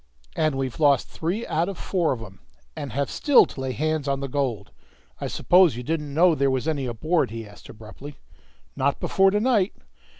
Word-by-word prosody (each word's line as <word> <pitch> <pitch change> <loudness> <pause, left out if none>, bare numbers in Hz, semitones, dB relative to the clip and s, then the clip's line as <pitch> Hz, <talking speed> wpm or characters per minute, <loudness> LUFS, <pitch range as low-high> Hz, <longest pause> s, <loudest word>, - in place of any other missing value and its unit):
And 155 -3 +1
we've 135 0 -3
lost 145 -4 +3
three 185 +8 -3
out 165 +4 -1
of 195 - -6
four 175 -4 0
of 120 -4 -3
'em, 95 -3 -13 0.4
and 140 - -6
have 140 +4 -1
still 290 -3 +5
to 130 - -9
lay 130 0 -2
hands 155 +1 -2
on 140 -1 0
the 140 - -4
gold! 125 -7 -3 0.5
I - - -3
suppose 180 -7 +4
you 125 - -5
didn't 150 +1 -3
know 170 +4 +4
there 140 -2 +1
was 130 +2 -1
any 145 -5 -1
aboard?" 155 +8 0
he 115 0 -7
asked 105 0 -15
abruptly. 115 +7 -11 0.6
"Not 140 +1 0
before 195 0 +3
to 205 +2 +1
night." 215 -4 +1
145 Hz, 200 wpm, -24 LUFS, 130-165 Hz, 0.6 s, still